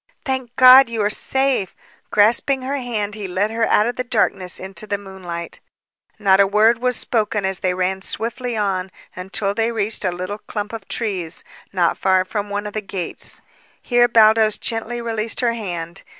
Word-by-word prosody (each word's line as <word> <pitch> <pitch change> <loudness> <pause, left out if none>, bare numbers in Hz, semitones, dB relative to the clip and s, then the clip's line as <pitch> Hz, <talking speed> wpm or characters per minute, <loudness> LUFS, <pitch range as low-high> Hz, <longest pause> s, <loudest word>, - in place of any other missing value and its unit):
"Thank 260 -3 -3
God! 255 0 +8
You 225 -2 -1
are 205 - +1
safe!" 265 -6 0 0.3
Grasping 240 +5 +3
her 275 +2 -2
hand 220 -5 -3
he 205 -2 -5
led 190 +4 -1
her 225 0 0
out 210 - +3
of 240 - -3
the 255 - -1
darkness 200 -6 0
into 190 +2 -6
the 205 - -1
moonlight. 185 -4 -8 0.6
Not 195 -2 +3
a 200 - +6
word 220 +3 +3
was 250 0 0
spoken 210 -3 -1
as 190 -1 -1
they 180 -1 0
ran 185 +1 -1
swiftly 235 +3 -4
on 190 -3 -1 0.3
until 195 +2 -3
they 225 +2 0
reached 215 -1 -1
a 185 - +1
little 185 +4 -5
clump 210 0 -6
of 220 -3 -7
trees, 185 -8 -4 0.3
not 175 -3 +1
far 185 -1 +3
from 205 +1 -4
one 205 +1 -3
of 210 - -6
the 215 - -2
gates. 195 -3 -4 0.4
Here 240 -1 +3
Baldos 220 -2 +4
gently 230 +1 -3
released 225 0 -2
her 235 -2 +2
hand. 175 -7 -6
210 Hz, 180 wpm, -20 LUFS, 190-230 Hz, 0.6 s, God